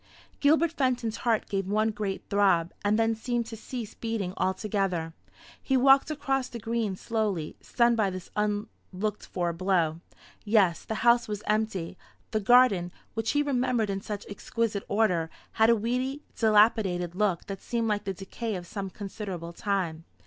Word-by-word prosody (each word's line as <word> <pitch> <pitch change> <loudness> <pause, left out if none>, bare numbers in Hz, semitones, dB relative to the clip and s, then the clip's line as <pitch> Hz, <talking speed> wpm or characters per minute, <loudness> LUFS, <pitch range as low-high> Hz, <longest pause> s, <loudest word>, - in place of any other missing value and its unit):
Gilbert 315 +3 +4
Fenton's 250 -7 0
heart 230 -3 0
gave 195 -2 -2
one 215 +2 +2
great 205 -2 -3
throb, 195 -5 +2
and 205 +1 +2
then 225 0 +2
seemed 235 +1 -2
to 225 0 -7
cease 225 0 -6
beating 225 -5 -3
altogether. 190 -4 -1 0.5
He 265 - +1
walked 270 +2 +5
across 270 -4 -1
the 235 - -6
green 225 -3 -2
slowly, 205 -7 -2
stunned 235 -1 +2
by 210 -3 +2
this 185 -1 -8
unlooked 210 -1 -3
for 175 -2 -1
blow. 170 -3 +1 0.4
Yes, 205 -6 +3
the 220 - -3
house 235 0 +5
was 210 0 -4
empty. 210 -5 -1 0.3
The 215 - +1
garden, 205 -5 +5 0.2
which 225 0 -1
he 290 0 +3
remembered 250 -6 +1
in 195 0 -3
such 205 0 -5
exquisite 210 0 -2
order, 185 -6 +1 0.2
had 220 0 +4
a 235 - +6
weedy 250 +6 -2
dilapidated 210 -5 +3
look 190 -3 0
that 195 -2 -6
seemed 230 -1 -1
like 210 -1 -1
the 195 - -2
decay 210 +3 -5
of 180 -1 -6
some 195 +1 -5
considerable 190 -4 -6
time. 170 -4 -2
210 Hz, 160 wpm, -28 LUFS, 190-230 Hz, 0.5 s, a